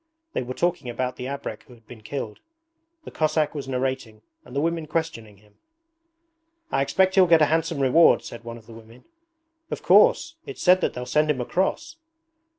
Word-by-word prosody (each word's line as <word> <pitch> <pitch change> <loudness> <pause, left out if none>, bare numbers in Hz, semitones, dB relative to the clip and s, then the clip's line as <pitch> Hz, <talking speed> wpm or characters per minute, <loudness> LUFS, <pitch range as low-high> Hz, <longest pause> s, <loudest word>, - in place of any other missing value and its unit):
They - - -1
were 125 0 -6
talking 175 -7 -1
about 125 +1 -3
the 125 - -5
abrek 135 -5 -6
who 125 - -15
had 115 -1 -24
been 120 -3 -12
killed. 110 -2 -6 0.6
The - - -10
Cossack 155 -1 0
was 145 -3 -6
narrating 130 -4 -3 0.2
and 125 - -13
the - - +1
women 165 0 -1
questioning 150 -10 -4
him. 105 0 -26 1.1
'I - - +1
expect 190 +7 +2
he'll 190 -2 +5
get 165 -2 +5
a 155 - +2
handsome 165 -1 0
reward,' 140 +5 +5
said 120 - -9
one 115 0 -8
of 115 - -16
the 115 - -13
women. 115 +2 -15 0.6
'Of - - -5
course. 330 -10 +4
It's 415 - -7
said 185 0 +5
that - - -1
they'll 125 0 -5
send 150 +4 +1
him 145 -4 +1
a 125 - -2
cross.' 315 - -2
135 Hz, 195 wpm, -24 LUFS, 120-165 Hz, 1.1 s, he'll